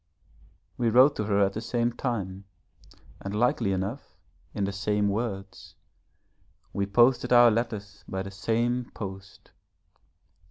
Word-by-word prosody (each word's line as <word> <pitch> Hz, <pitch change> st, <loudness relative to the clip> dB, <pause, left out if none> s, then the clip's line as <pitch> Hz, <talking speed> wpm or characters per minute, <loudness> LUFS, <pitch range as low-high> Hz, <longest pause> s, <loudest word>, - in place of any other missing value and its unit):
We 120 Hz, -2 st, +2 dB
wrote 130 Hz, +5 st, +6 dB
to 105 Hz, -, -1 dB
her 100 Hz, -1 st, +1 dB
at 95 Hz, -, -2 dB
the 110 Hz, -, -4 dB
same 120 Hz, +1 st, -1 dB
time 100 Hz, -7 st, -4 dB, 0.7 s
and 100 Hz, +1 st, -5 dB
likely 115 Hz, -2 st, +1 dB
enough, 95 Hz, +8 st, -4 dB, 0.3 s
in 100 Hz, -, -3 dB
the 100 Hz, -, -1 dB
same 105 Hz, +1 st, 0 dB
words, 100 Hz, -2 st, -5 dB, 1.0 s
we 100 Hz, 0 st, -1 dB
posted 120 Hz, +6 st, +3 dB
our 120 Hz, -1 st, +7 dB
letters 110 Hz, -3 st, -3 dB
by 95 Hz, 0 st, -3 dB
the 95 Hz, -, -8 dB
same 120 Hz, +5 st, -1 dB
post. 95 Hz, -1 st, -9 dB
105 Hz, 130 wpm, -27 LUFS, 100-120 Hz, 1.0 s, our